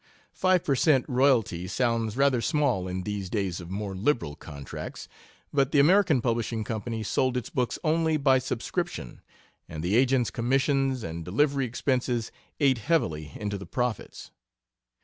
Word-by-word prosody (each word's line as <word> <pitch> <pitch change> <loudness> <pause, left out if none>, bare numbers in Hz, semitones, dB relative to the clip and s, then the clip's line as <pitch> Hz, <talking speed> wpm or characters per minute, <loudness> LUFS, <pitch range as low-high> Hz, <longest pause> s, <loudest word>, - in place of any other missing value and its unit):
Five 185 -2 +2
per 140 - +1
cent. 135 -1 +3
royalty 115 -9 +2
sounds 115 0 0
rather 135 -3 +3
small 140 - +1
in 90 0 -3
these 100 -2 -4
days 95 -5 -2
of 85 - -10
more 100 +1 -4
liberal 100 - 0
contracts. 70 -2 -8 0.5
But 140 -1 +2
the - - +2
American 160 - +4
Publishing 115 -2 -1
Company 110 +1 -4
sold 125 +4 0
its 125 - -4
books 125 -2 -1
only 160 0 +2
by 135 -2 +4
subscription, 130 - -4 0.5
and 80 -1 -6
the 90 +4 +1
agents' 130 -1 +3
commissions 135 +1 +1
and 85 0 -5
delivery 135 - +1
expenses 125 -1 -1 0.3
ate 135 -5 +3
heavily 80 - -1
into 105 -1 -4
the 100 - -9
profits. 125 -4 -3
120 Hz, 150 wpm, -27 LUFS, 105-140 Hz, 0.5 s, American